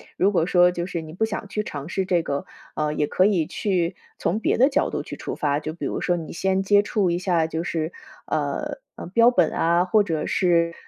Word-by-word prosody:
如 195 +2 +3
果 170 -5 +2
说 180 0 +4
就 175 -1 -3
是 175 -2 -4
你 155 -1 -10
不 190 +7 0
想 205 -2 -5
去 210 +1 -2
尝 145 -5 -7
试 190 +1 -1
这 175 -2 +1
个， 140 -2 -3 0.3
呃， 150 -1 0
也 150 -1 0
可 185 - +2
以 190 -6 +2
去 180 0 -1 0.2
从 205 - -1
别 - - +1
的 260 +4 +5
角 290 +2 +1
度 - - -3
去 - - -8
出 - - -5
发。 145 -1 0
就 155 +1 -5
比 170 - -10
如 - - -2
说 175 - +1
你 165 -2 -6
先 190 +2 0
接 205 +1 +5
触 205 -3 0
一 170 - 0
下， 175 -3 +1
就 160 0 -3
是， 165 -1 -2 0.3
呃 155 - -2 0.2
呃， - - -8
标 230 +6 +5
本 180 -9 +3
啊， 170 +1 +2
或 200 +4 +3
者 160 -6 -2
是 170 -2 +2
175 Hz, 255 characters per minute, -23 LUFS, 160-195 Hz, 0.3 s, 的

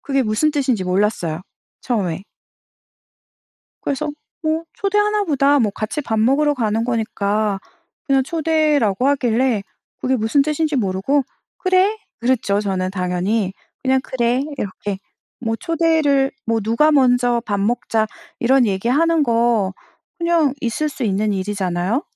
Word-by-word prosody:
그게 275 -1 0
무슨 225 +7 +1
뜻인지 265 -9 0
몰랐어요 180 -3 0 0.4
처음에. 190 -8 -1 1.6
그래서 295 +2 -2 0.3
뭐 315 +1 0
'초대하나 415 +1 +1
보다.' 285 -2 +3
뭐 220 -6 +2
같이 215 +8 -3
밥 220 -6 -2
먹으러 285 +6 +3
가는 225 -2 0
거니까. 215 -3 0 0.5
그냥 270 -1 +3
초대라고 300 - +1
하길래 245 -5 +1 0.4
그게 260 0 +1
무슨 230 +5 +2
뜻인지 305 0 0
모르고 205 +6 +1 0.4
"그래." 375 +3 +2 0.2
그랬죠 235 -5 +1
저는 190 -2 -1
당연히. 185 +2 -1 0.3
그냥 265 0 +2
"그래." 245 +1 0 0.2
이렇게 200 0 -4 0.4
뭐 225 -2 -1
초대를 320 -5 +2 0.2
뭐 230 0 +1
누가 230 +9 +3
먼저 245 -3 +3
"밥 205 -1 -1
먹자." 220 0 0 0.3
이런 255 +1 +4
얘기 195 +2 -1
하는 325 +4 +3
거 230 -5 +2 0.5
그냥 335 -5 +2
있을 245 +6 -1
수 285 -3 -7
있는 210 0 +1
일이잖아요. 195 - -1
240 Hz, 280 characters per minute, -20 LUFS, 210-290 Hz, 1.6 s, 이런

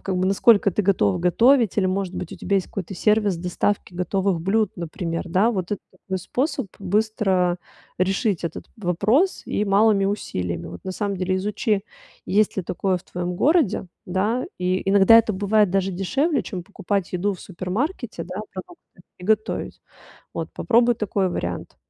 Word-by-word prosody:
как 190 -2 -2
бы 185 +1 +1
насколько 200 +1 +4
ты 210 - 0
готов 170 - +2
готовить 230 +5 +4
или, 190 - +3
может 190 0 -1
быть, 175 - -5
у - - -8
тебя 200 -1 +1
какой-то 190 +1 -6
сервис 210 -1 +2
доставки 180 +2 -2
готовых 185 0 0
блюд, 200 +4 +1
например, 170 0 -4
да, 195 +7 +3
вот. 185 -4 -3
Это 205 - -3
такой 190 0 -5
способ 255 - -2
быстро 195 -3 +1 0.4
решить 195 +1 +1
этот 165 - -4
вопрос 215 - +1
и 210 - 0
малыми 200 0 +4
усилиями, 90 - -3
вот. 90 - -10
На 190 - -3
самом 200 0 -2
деле 185 +1 0
изучи, 210 +1 -1 0.4
есть 210 +1 +2
ли 190 - -1
такое 185 +2 0
в - - -20
твоем 180 0 -4
городе, 295 - +2 0.2
да. 205 +7 0
И 185 +1 0
иногда 200 +3 +7
это 220 -1 +2
бывает 205 0 +2
даже 195 0 0
дешевле, 270 - 0
чем 180 -4 -6
покупать 200 -1 -3
еду 195 +3 0
в - - -13
супермаркете, 210 - -4
да, 180 +1 -8 0.2
продукты, 190 - -12 0.2
и 180 - -10
готовить. 215 +1 -1 0.5
Вот - - -4
попробуй 240 0 +3
такой 200 -3 0
вариант. 90 - -4
195 Hz, 165 wpm, -23 LUFS, 180-215 Hz, 0.5 s, иногда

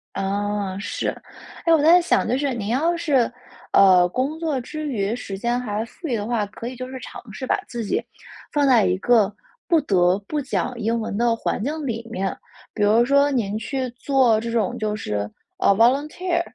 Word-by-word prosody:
啊， 200 0 -2
是， - - -2 0.6
哎， 330 - +5
我 310 - +4
在 340 +4 +6
想， 345 - +1
就 250 +3 +1
是 275 -2 -1
你 210 -3 -4
要 315 +9 +1
是， 280 -8 +2 0.4
呃， 185 -2 +6
工 270 - -2
作 315 -5 -1
之 305 +5 -6
余， 215 -4 -1
时 195 -5 -6
间 240 +4 0
还 220 -2 -3
富 325 +7 -9
裕 250 - 0
的 205 -2 -3
话， 225 -2 0
可 230 +3 -8
以 255 - -6
就 255 +1 -6
是 260 0 -7
尝 - - -9
试 260 +6 -6
把 - - +2
自 235 -1 -5
己， - - 0 0.5
放 290 -1 +2
在 240 -7 +5
一 185 0 +1
个 215 -1 +3 0.3
不 335 -3 +4
得 185 -6 +3
不 300 -1 -2
讲 260 -1 -2
英 230 +2 0
文 220 - -4
的 235 -1 +2
环 220 - -2
境 300 +3 -3
里 230 -2 -4
面。 190 -1 -2 0.4
比 210 - -4
如 220 +3 +4
说 280 +2 +4
您 215 -6 -1
去 260 +3 -3
做 250 -3 +2
这 230 - -4
种 225 -4 0
就 215 -1 -1
是， 105 - -3 0.3
啊， - - +2
volunteer， 300 - +2
235 Hz, 245 characters per minute, -22 LUFS, 205-275 Hz, 0.6 s, 在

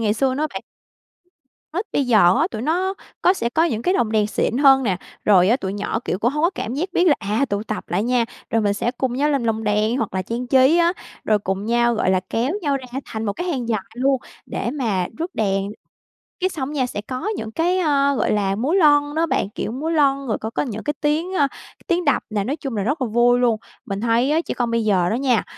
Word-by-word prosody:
ngày 210 -2 +1
xưa 260 +3 +1
nữa 305 +3 0
bạn. - - -4 1.1
Nít 375 +6 -2
bây 275 - +1
giờ 210 -7 +5
á, 310 - +3
tụi 215 - -5
nó 365 +6 0 0.3
có 360 - +5
sẽ 235 -11 -2
có 320 +6 +2
những 230 -9 -1
cái 365 - +1
lồng 225 - +1
đèn 215 -1 +3
xịn 225 +3 -1
hơn 270 -1 +6
nè, 200 -7 0 0.3
rồi 190 -2 +5
á, 240 - +4
tụi 190 -6 -4
nhỏ, 205 +2 -2
kiểu, 185 - -2
cũng 235 +4 +1
hông 300 +2 -2
có 340 - +4
cảm 230 +4 -4
giác 335 +7 -2
biết 360 - +2
là, 305 - +6
à, 210 +7 0
tụ 200 +1 -1
tập 215 -1 -5
lại 180 +3 0
nha. 245 0 +2 0.3
Rồi 225 -1 +2
mình 200 -1 +1
sẽ 235 - -1
cùng 255 0 -2
nhau 290 +3 +1
làm 275 -4 0
lồng 225 -1 -1
đèn 210 +3 +1
hoặc 225 -7 -3
là 185 - 0
trang 235 +5 -4
trí 265 +4 +5
á, 340 +1 +4 0.3
rồi 215 -1 +3
cùng 195 0 -3
nhau, 240 0 +2
gọi 200 -4 +1
là, 185 - +2
kéo 235 +4 0
nhau 285 -2 +1
ra 260 -2 -8 0.2
thành 220 0 -5
một 205 - -1
cái 350 - -5
hàng 260 -9 -2
dài 215 -3 0
luôn 265 +2 +2 0.3
để 235 - -3
mà 220 -10 -1
rước 340 +3 -4
đèn. 195 -2 0 0.7
Cái 370 0 +1
xong 285 -5 -4
nha, 260 -4 +1
sẽ 205 -4 -5
có 255 - -5
những 220 0 -5
cái, 350 +8 +1
ờ, 280 -4 +2
gọi - - +1
là, 195 -2 +1
múa 265 - -1
lon 290 -5 +4
đó 325 +1 +2
bạn, 205 - -1
kiểu 215 - -4
múa 285 +7 -3
lon, 275 -4 +2
rồi 220 - 0
có 220 - -3
có - - -2
những 220 -6 -5
cái 295 - -1
tiếng, 310 +5 0
a, 285 -4 +3
t - - -17
tiếng 345 -1 +1
đập 285 -3 +2
nè, 205 -2 -1
nói 270 +7 -2
chung 270 -7 -5
là 200 - 0
rất 280 +8 -1
là 255 - +1
vui 240 +2 +3
luôn. 240 -3 +2 0.3
Mình 195 0 -4
thấy 235 +4 +2
á, 320 +2 +2
trẻ - - -4
con 240 -2 -1
bây 230 -1 +1
giờ 180 -4 +2
đó - - 0
nha, 250 -3 +2
245 Hz, 265 wpm, -21 LUFS, 215-290 Hz, 1.1 s, hơn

